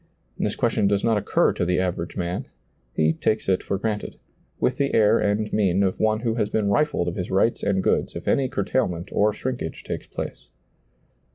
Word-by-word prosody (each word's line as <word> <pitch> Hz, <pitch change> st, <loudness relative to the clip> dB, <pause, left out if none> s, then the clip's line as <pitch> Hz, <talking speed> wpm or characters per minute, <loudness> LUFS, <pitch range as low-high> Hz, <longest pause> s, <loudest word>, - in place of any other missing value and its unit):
This -, -, 0 dB
question 110 Hz, -3 st, +1 dB
does 100 Hz, 0 st, +1 dB
not 115 Hz, -2 st, +3 dB
occur -, -, +2 dB
to -, -, -2 dB
the 90 Hz, +1 st, +1 dB
aven^ 90 Hz, -2 st, -2 dB
man; 90 Hz, 0 st, -3 dB, 0.5 s
he 80 Hz, 0 st, +3 dB
takes 110 Hz, +6 st, -1 dB
it 95 Hz, -1 st, +2 dB
for 100 Hz, -, -2 dB
granted, 105 Hz, 0 st, -3 dB, 0.4 s
with -, -, +1 dB
the 140 Hz, 0 st, 0 dB
air 110 Hz, +1 st, +5 dB
and 105 Hz, +1 st, 0 dB
mien 100 Hz, -2 st, +2 dB
of 95 Hz, -1 st, 0 dB
one 110 Hz, 0 st, +2 dB
who 115 Hz, -2 st, 0 dB
has 110 Hz, -3 st, 0 dB
been 105 Hz, -2 st, 0 dB
rifled 140 Hz, -, +1 dB
of 85 Hz, -, -2 dB
his 90 Hz, -, -4 dB
rights 100 Hz, +5 st, +2 dB
and 95 Hz, -1 st, +1 dB
goods, -, -, +1 dB
if -, -, -7 dB
any 135 Hz, -2 st, +2 dB
curtailment 95 Hz, -5 st, -1 dB
or 105 Hz, +1 st, +3 dB
shrinkage 125 Hz, -7 st, -4 dB
takes -, -, -5 dB
place. -, -, -7 dB
105 Hz, 195 wpm, -24 LUFS, 90-110 Hz, 0.5 s, air